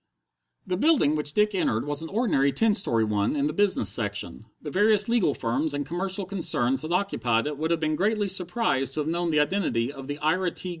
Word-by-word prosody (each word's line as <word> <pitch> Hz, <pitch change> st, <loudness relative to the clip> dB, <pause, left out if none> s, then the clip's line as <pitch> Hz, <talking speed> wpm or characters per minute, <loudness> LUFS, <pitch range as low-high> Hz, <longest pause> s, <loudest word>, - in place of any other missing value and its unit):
The 185 Hz, -1 st, -2 dB
building 255 Hz, -, +3 dB
which 150 Hz, -1 st, -2 dB
Dick 210 Hz, 0 st, +2 dB
entered 115 Hz, -, 0 dB
was 145 Hz, +1 st, -1 dB
an 165 Hz, -, -7 dB
ordinary 190 Hz, -, +1 dB
ten 215 Hz, -, +2 dB
story 115 Hz, -, +1 dB
one 105 Hz, +3 st, 0 dB
in 140 Hz, -1 st, 0 dB
the 150 Hz, -, -1 dB
business 195 Hz, -, +1 dB
section; 105 Hz, -2 st, -2 dB
the 150 Hz, -, -7 dB
various 210 Hz, +2 st, +3 dB
legal 230 Hz, -, +2 dB
firms 140 Hz, +6 st, -1 dB
and 145 Hz, 0 st, -3 dB
commercial 185 Hz, +5 st, -2 dB
concerns 145 Hz, -9 st, 0 dB
that 155 Hz, +2 st, -5 dB
occupied 125 Hz, -, 0 dB
it 150 Hz, -1 st, -4 dB
would 160 Hz, +1 st, -1 dB
have 170 Hz, -1 st, +1 dB
been 155 Hz, -1 st, 0 dB
greatly 210 Hz, +3 st, 0 dB
surprised 180 Hz, -, 0 dB
to 155 Hz, -, -1 dB
have 150 Hz, -, -4 dB
known 170 Hz, +1 st, -1 dB
the 155 Hz, -2 st, +2 dB
identity 150 Hz, -7 st, 0 dB
of 135 Hz, -2 st, -10 dB
the 145 Hz, 0 st, -4 dB
Ira 165 Hz, +5 st, 0 dB
T. 180 Hz, -, -4 dB
155 Hz, 215 wpm, -25 LUFS, 135-195 Hz, -, building